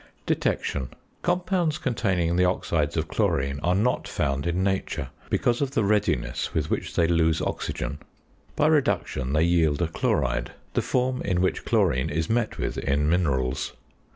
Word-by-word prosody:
~Detection.~ 65 -3 0 0.3
Compounds 175 -3 +1
containing 95 - 0
the 90 - +3
oxides 85 -4 0
of - - 0
chlorine 70 +1 0
are 90 +2 +2
not 115 +6 +1
found 70 +3 -1
in 90 +2 0
nature, 95 -7 -1 0.2
because 120 +2 +1
of 140 -1 -1
the 110 - +3
readiness 100 - 0
with - - -1
which - - -2
they 85 - +4
lose 80 -1 +2
oxygen. 75 0 -3 0.6
By - - +2
reduction 135 - +1
they 75 +1 +3
yield 80 -4 +3
a 85 - +1
chloride; - - 0 0.2
the - - +2
form 130 0 0
in 90 -3 0
which 95 +1 0
chlorine 65 +1 +2
is 80 +4 -1
met 115 -1 0
with - - -2
in 75 +2 +1
minerals. 65 -7 0
85 Hz, 155 wpm, -25 LUFS, 70-110 Hz, 0.6 s, they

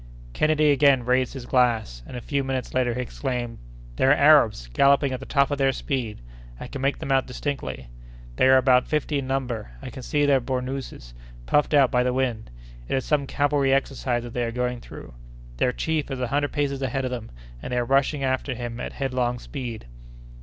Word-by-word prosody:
Kennedy 155 -1 +3
again 140 -3 +4
raised 125 0 +1
his 130 -3 -7
glass, 115 - +1
and 125 - -7
a - - -6
few 140 +3 -1
minutes 130 -1 -3
later 125 -2 +1
he 125 - -2
exclaimed: 125 -2 -4 0.4
"They - - +2
are 135 - +6
Arabs, 140 - +5
galloping 140 0 +4
at 130 - -3
the 135 - -10
top 140 0 +2
of 145 - -1
their 135 -1 +3
speed; 125 - -3 0.4
I - - -6
can 135 - -7
make 135 +1 +1
them 135 - -5
out 135 -1 +2
distinctly. 125 - -4 0.5
They - - +4
are 130 0 +7
about 130 -1 +4
fifty 150 -1 0
in 135 - -5
number. 125 - -3
I 125 - -8
can 130 - -8
see 145 +3 +1
their 140 -2 +4
bournouses 130 - -5 0.3
puffed 150 - +2
out 135 -3 +5
by 125 - +3
the 125 0 +1
wind. 125 - -1 0.4
It - - -1
is 130 - -1
some 145 -3 +1
cavalry 145 -1 +1
exercise 135 -3 0
that 120 -1 -8
they 120 - -1
are 115 - -2
going 125 0 -2
through. - - -11 0.4
Their 125 - +2
chief 155 +2 -2
is 135 -2 -4
a 125 - 0
hundred 145 +1 0
paces 140 -2 -1
ahead 135 0 -1
of 130 - -3
them 120 -3 -5 0.3
and - - -6
they 125 - 0
are 120 - +1
rushing 135 +2 +1
after 130 0 -1
him 120 -1 -5
at - - -5
headlong 125 -3 -1
speed." 120 - -7
130 Hz, 210 wpm, -24 LUFS, 125-140 Hz, 0.5 s, are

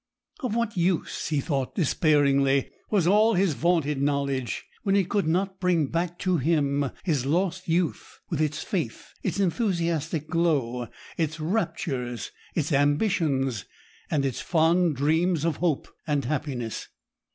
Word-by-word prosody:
Of 250 -6 -2
what 235 -2 -1
use, 175 -1 0
he 150 -2 0
thought 135 -3 -2
despairingly, 140 -4 +3 0.2
was 200 -6 +2
all 210 +4 +5
his 185 -3 +2
vaunted 150 -3 +1
knowledge, 140 -3 -1 0.2
when 195 -2 +1
it 190 -3 +2
could 200 -5 +1
not 190 +3 0
bring 175 -6 +1
back 175 +1 -1
to 185 -2 +2
him 140 -2 +1
his 145 -8 0
lost 180 +4 0
youth, 170 0 -1
with 160 -3 -2
its 155 0 -1
faith, 170 - -4
its - - -2
enthusiastic 170 - 0
glow, 135 -8 0 0.3
its 160 -1 -1
raptures, 155 - -2 0.2
its 155 -1 0
ambitions, 145 - +1 0.4
and 145 -3 +1
its 130 -3 -2
fond 165 -1 +3
dreams 160 +4 +2
of 165 -3 0
hope 165 -5 0 0.2
and 145 -4 0
happiness? 130 -5 -3
160 Hz, 140 wpm, -26 LUFS, 140-180 Hz, 0.4 s, all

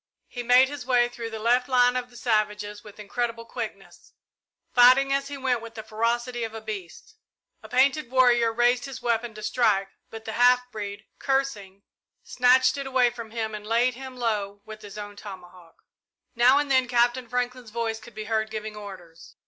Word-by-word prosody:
He 245 - -6
made 250 +2 +5
his 285 -1 -7
way 245 -1 +3
through 240 -1 -7
the 225 - -6
left 245 +4 +1
line 245 -1 +4
of 250 -1 -3
the 240 - -15
savages 210 -3 -1
with 210 -1 -14
incredible 230 +2 -3
quickness, - - -8 0.6
fighting 255 +3 +6
as 275 0 0
he 285 0 -6
went 255 -3 0
with 230 0 -10
the 220 - -7
ferocity 235 +2 -1
of 225 0 -5
a - - -5
beast. 215 - -8 0.4
A - - -13
painted 265 +1 +2
warrior 245 -3 +4
raised 240 +2 +2
his 275 -1 -8
weapon 235 -1 -1
to 215 - -9
strike, 210 -5 +1 0.2
but 225 0 -10
the 220 - -4
half 250 +2 +3
breed, 205 -1 -6
cursing, 215 -8 -2 0.4
snatched 255 +1 +3
it 275 -1 -4
away 255 -2 +3
from 230 -2 -9
him 220 -1 -4
and 210 0 -7
laid 235 +3 +2
him 260 0 -9
low 205 -4 -2
with 215 0 -10
his 205 0 -10
own 205 0 -7
tomahawk. 180 -4 -12 0.5
Now 250 +3 +5
and 290 -1 0
then 260 -1 +3
Captain 245 0 +1
Franklin's 250 -1 -3
voice 225 0 -3
could 225 0 -15
be 215 - -5
heard 220 0 -1
giving 215 -1 -6
orders. 185 -5 -11
235 Hz, 190 wpm, -25 LUFS, 215-250 Hz, 0.6 s, fighting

